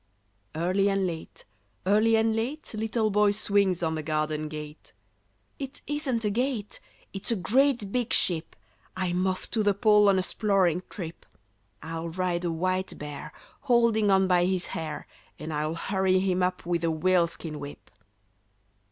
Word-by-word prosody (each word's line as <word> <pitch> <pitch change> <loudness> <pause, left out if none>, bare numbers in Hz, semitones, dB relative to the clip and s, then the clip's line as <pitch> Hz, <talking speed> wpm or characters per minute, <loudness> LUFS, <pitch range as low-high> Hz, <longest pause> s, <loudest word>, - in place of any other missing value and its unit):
Early 185 +5 +2
and 195 -1 +1
late, 165 -3 -6 0.4
early 215 +3 +4
and 220 0 +2
late, 250 +7 -3
Little 220 0 0
Boy 210 +1 +4
swings 200 -4 +1
on 160 -1 +1
the 160 - -2
garden 155 0 -1
gate. 150 0 -9 0.7
"It 270 0 -7
isn't 275 -6 -1
a 210 - +1
gate; 240 -2 -2 0.3
it's 195 - -4
a 230 - +2
great 235 - +2
big 245 -1 -1
ship! 165 -2 +1 0.4
I'm 185 0 0
off 185 0 -3
to 225 - +1
the 205 -1 +2
Pole 210 -1 +5
on 195 - +4
a 185 - +1
'sploring 190 -4 +1
trip. 170 -4 -7 0.6
I'll 165 +1 -4
ride 180 0 -1
a 175 - 0
white 185 +3 -1
bear, 145 -1 -7 0.4
holding 230 -3 +4
on 190 -1 +4
by 180 -1 +4
his 185 -1 0
hair, 155 -2 -4 0.3
And 155 +1 -6
I'll 155 +2 -1
hurry 190 +2 +1
him 185 -1 +1
up 180 -1 -1
with 170 -1 -1
a 165 - +2
whaleskin 170 -2 0
whip." 145 0 -10
185 Hz, 160 wpm, -27 LUFS, 165-215 Hz, 0.7 s, Pole